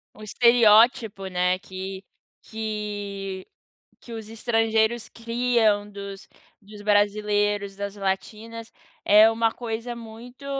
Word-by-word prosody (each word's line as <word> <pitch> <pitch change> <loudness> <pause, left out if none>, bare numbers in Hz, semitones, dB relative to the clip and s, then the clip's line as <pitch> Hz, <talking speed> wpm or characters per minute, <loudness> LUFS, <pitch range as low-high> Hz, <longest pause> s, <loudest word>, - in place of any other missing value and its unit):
O 215 - -15
estereótipo, 225 -1 +4
né, 180 0 +1
que 190 0 -7 0.4
que 205 -3 -5 0.5
que 240 - -13
os 220 -2 -7
estrangeiros 225 0 0
criam 230 -3 +1
dos 200 -1 -9 0.3
dos 205 0 -13
brasileiros, 205 -1 +1
das 200 0 -5
latinas, 215 +3 -4 0.3
é 210 +2 +7
uma 225 0 +1
coisa 235 0 -5
muito, 235 +4 -11
215 Hz, 100 wpm, -24 LUFS, 200-230 Hz, 0.5 s, é